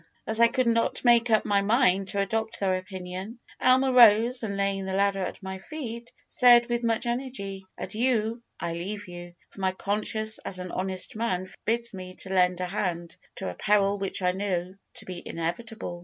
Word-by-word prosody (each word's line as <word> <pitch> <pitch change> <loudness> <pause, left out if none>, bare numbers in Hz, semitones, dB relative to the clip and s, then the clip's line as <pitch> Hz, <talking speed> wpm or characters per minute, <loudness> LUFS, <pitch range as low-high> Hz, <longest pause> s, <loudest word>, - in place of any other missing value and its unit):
As 220 +1 +3
I 235 - +7
could 255 +2 0
not 230 +2 0
make 240 0 +5
up 220 -1 +3
my 200 -1 +2
mind 200 -3 +2
to 200 - 0
adopt 220 +3 -1
their 190 -2 +1
opinion, 185 +3 -7 0.2
Almer 260 +1 +4
rose, 235 +1 +6
and 200 -3 -3
laying 195 -1 -1
the 190 - -2
ladder 200 0 +1
at 185 - -6
my 190 0 -6
feet, 235 -1 -7 0.2
said, 240 -1 +6
with 240 0 -1
much 230 0 0
energy, 235 -6 -4
'Adieu, 230 0 0 0.2
I 170 0 -3
leave 200 +4 -5
you, 175 0 -10 0.2
for 195 - -11
my 190 0 +1
conscience 215 +3 0
as 185 - -4
an 180 -1 -6
honest 185 +1 -1
man 190 -5 -1
forbids 230 +4 -2
me 185 -1 -8
to 190 - -2
lend 180 -1 +3
a - - 0
hand 175 -2 -3 0.2
to - - -4
a - - -6
peril 200 - +1
which 195 -1 -1
I 180 - +3
know 185 -2 -3 0.2
to - - -7
be 180 -2 -7
inevitable.' 175 +3 -5
200 Hz, 190 wpm, -26 LUFS, 185-230 Hz, 0.2 s, I